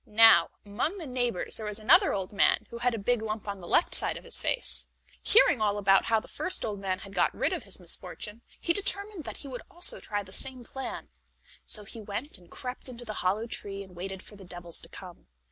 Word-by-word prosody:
Now, 215 Hz, -6 st, +7 dB, 0.2 s
among 240 Hz, -, -2 dB
the 340 Hz, -, -7 dB
neighbors 245 Hz, -7 st, -1 dB
there 220 Hz, -, -6 dB
was 210 Hz, -1 st, -4 dB
another 360 Hz, -, +5 dB
old 195 Hz, 0 st, -3 dB
man 200 Hz, -, +3 dB
who 235 Hz, -, -7 dB
had 245 Hz, 0 st, +1 dB
a -, -, -3 dB
big 230 Hz, +3 st, 0 dB
lump 215 Hz, -1 st, -4 dB
on 200 Hz, -2 st, -5 dB
the 175 Hz, -, -10 dB
left 340 Hz, -, +3 dB
side -, -, +4 dB
of -, -, -11 dB
his -, -, +2 dB
face. -, -, -1 dB, 0.3 s
Hearing 420 Hz, -, +5 dB
all 210 Hz, -1 st, +1 dB
about 195 Hz, -1 st, +4 dB
how 225 Hz, -1 st, +3 dB
the -, -, -14 dB
first 370 Hz, -, +1 dB
old 205 Hz, -2 st, -4 dB
man 190 Hz, -1 st, -2 dB
had 195 Hz, +1 st, -12 dB
got -, -, +2 dB
rid -, -, 0 dB
of -, -, -4 dB
his -, -, -1 dB
misfortune, 215 Hz, +2 st, -3 dB, 0.2 s
he 335 Hz, -, +1 dB
determined 400 Hz, -2 st, 0 dB
that -, -, -6 dB
he 285 Hz, -, -8 dB
would 250 Hz, -2 st, -6 dB
also 350 Hz, +1 st, +5 dB
try 205 Hz, -1 st, -3 dB
the 190 Hz, -1 st, -14 dB
same 260 Hz, +1 st, -1 dB
plan. 265 Hz, +3 st, -7 dB, 0.6 s
So 210 Hz, -, -1 dB
he 220 Hz, +2 st, -9 dB
went 210 Hz, +3 st, -5 dB
and 175 Hz, -1 st, -20 dB
crept 255 Hz, +1 st, -5 dB
into 240 Hz, -1 st, -9 dB
the 215 Hz, -, -5 dB
hollow 200 Hz, +5 st, 0 dB
tree, 200 Hz, -3 st, -4 dB
and 185 Hz, -2 st, -16 dB
waited 190 Hz, +2 st, -6 dB
for 210 Hz, -, -13 dB
the 195 Hz, -, -13 dB
devils 175 Hz, -2 st, -7 dB
to -, -, -12 dB
come. 180 Hz, -3 st, -12 dB
215 Hz, 235 wpm, -28 LUFS, 195-250 Hz, 0.6 s, Now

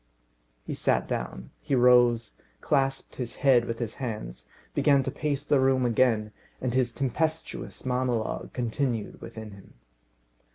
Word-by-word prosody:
He -, -, -4 dB
sat -, -, +1 dB
down, 60 Hz, -1 st, -4 dB
he 145 Hz, -3 st, 0 dB
rose, 120 Hz, -2 st, +4 dB, 0.2 s
clasped 135 Hz, -2 st, 0 dB
his 125 Hz, -3 st, -4 dB
head 125 Hz, -3 st, +6 dB
with 115 Hz, -1 st, -3 dB
his 115 Hz, -2 st, -3 dB
hands, 105 Hz, -, -5 dB, 0.3 s
began 140 Hz, -2 st, +4 dB
to -, -, -3 dB
pace 145 Hz, -2 st, -2 dB
the 145 Hz, -2 st, +3 dB
room 130 Hz, -1 st, +3 dB
again, 115 Hz, -3 st, +2 dB, 0.3 s
and 125 Hz, -2 st, -2 dB
his 125 Hz, -2 st, +2 dB
tempestuous 155 Hz, +7 st, -2 dB
monologue 125 Hz, -3 st, -1 dB
continued 120 Hz, -2 st, -2 dB
within 110 Hz, -1 st, -8 dB
him. 100 Hz, -1 st, -15 dB
125 Hz, 135 wpm, -27 LUFS, 115-135 Hz, 0.3 s, head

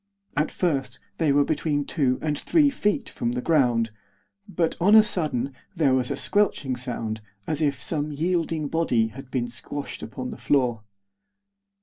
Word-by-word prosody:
At 150 Hz, 0 st, +1 dB
first 135 Hz, -8 st, -1 dB, 0.2 s
they 160 Hz, -4 st, +3 dB
were 145 Hz, +1 st, +4 dB
between 145 Hz, -1 st, 0 dB
two 135 Hz, -5 st, +1 dB
and 150 Hz, -1 st, 0 dB
three 295 Hz, -, +3 dB
feet 210 Hz, -5 st, 0 dB
from 120 Hz, 0 st, -2 dB
the 125 Hz, -, -2 dB
ground; 120 Hz, -8 st, +2 dB, 0.6 s
but, 170 Hz, -4 st, 0 dB
on 205 Hz, +5 st, +6 dB
a 220 Hz, -, +9 dB
sudden, 145 Hz, -, -1 dB, 0.2 s
there 150 Hz, -6 st, +3 dB
was 130 Hz, -1 st, +2 dB
a -, -, -1 dB
squelching 175 Hz, -10 st, +1 dB
sound, 115 Hz, -3 st, -4 dB, 0.2 s
as 155 Hz, -1 st, -2 dB
if 140 Hz, -3 st, +1 dB
some 150 Hz, +2 st, -1 dB
yielding 165 Hz, 0 st, -1 dB
body 125 Hz, -8 st, +1 dB
had 135 Hz, +3 st, -11 dB
been 125 Hz, -2 st, -1 dB
squashed 125 Hz, +4 st, -7 dB
upon 125 Hz, +3 st, -6 dB
the -, -, -7 dB
floor. 125 Hz, -6 st, +1 dB
145 Hz, 160 wpm, -25 LUFS, 125-160 Hz, 0.6 s, a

